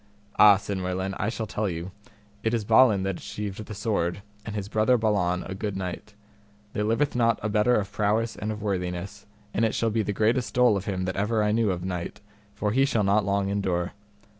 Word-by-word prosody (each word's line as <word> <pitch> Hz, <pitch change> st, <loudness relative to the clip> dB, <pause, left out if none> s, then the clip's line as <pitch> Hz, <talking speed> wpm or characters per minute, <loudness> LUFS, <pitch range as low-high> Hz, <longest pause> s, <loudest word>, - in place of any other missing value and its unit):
Ah, 105 Hz, -2 st, +9 dB
said 100 Hz, -1 st, -4 dB
Merlin, 95 Hz, +1 st, -2 dB
I 105 Hz, -, 0 dB
shall 115 Hz, -1 st, -3 dB
tell 105 Hz, -1 st, -2 dB
you: 85 Hz, +2 st, -5 dB, 0.5 s
it 115 Hz, +1 st, +1 dB
is 110 Hz, -3 st, -2 dB
Balin 110 Hz, -3 st, +5 dB
that 95 Hz, -2 st, -2 dB
achieved 105 Hz, 0 st, -5 dB
the 105 Hz, 0 st, -8 dB
sword, 100 Hz, -3 st, -1 dB, 0.2 s
and 110 Hz, -1 st, -6 dB
his 100 Hz, -2 st, -3 dB
brother 110 Hz, +4 st, +3 dB
Balan, 100 Hz, -5 st, +1 dB
a 95 Hz, -, -6 dB
good 100 Hz, 0 st, -4 dB
knight, 95 Hz, +3 st, -6 dB, 0.6 s
there 105 Hz, -, -1 dB
liveth 115 Hz, +7 st, +1 dB
not 115 Hz, -2 st, +2 dB
a 110 Hz, -, 0 dB
better 105 Hz, +4 st, +3 dB
of 100 Hz, -1 st, -1 dB
prowess 110 Hz, +2 st, 0 dB
and 105 Hz, +1 st, -3 dB
of 105 Hz, -1 st, -6 dB
worthiness, 90 Hz, -1 st, -3 dB, 0.3 s
and 115 Hz, -, +1 dB
it 110 Hz, -, +1 dB
shall 115 Hz, -1 st, +1 dB
be 110 Hz, +1 st, +1 dB
the 105 Hz, -, -2 dB
greatest 115 Hz, +5 st, 0 dB
dole 125 Hz, -3 st, +5 dB
of 100 Hz, 0 st, -3 dB
him 95 Hz, -2 st, -2 dB
that 95 Hz, 0 st, -3 dB
ever 105 Hz, +2 st, +1 dB
I 105 Hz, -, +2 dB
knew 110 Hz, -1 st, +2 dB
of 90 Hz, -1 st, -2 dB
knight, 90 Hz, -2 st, -4 dB, 0.4 s
for 105 Hz, 0 st, -1 dB
he 135 Hz, +5 st, +3 dB
shall 115 Hz, -6 st, +1 dB
not 100 Hz, +1 st, +2 dB
long 100 Hz, 0 st, 0 dB
endure. 95 Hz, -3 st, -1 dB
105 Hz, 215 wpm, -26 LUFS, 95-110 Hz, 0.6 s, Ah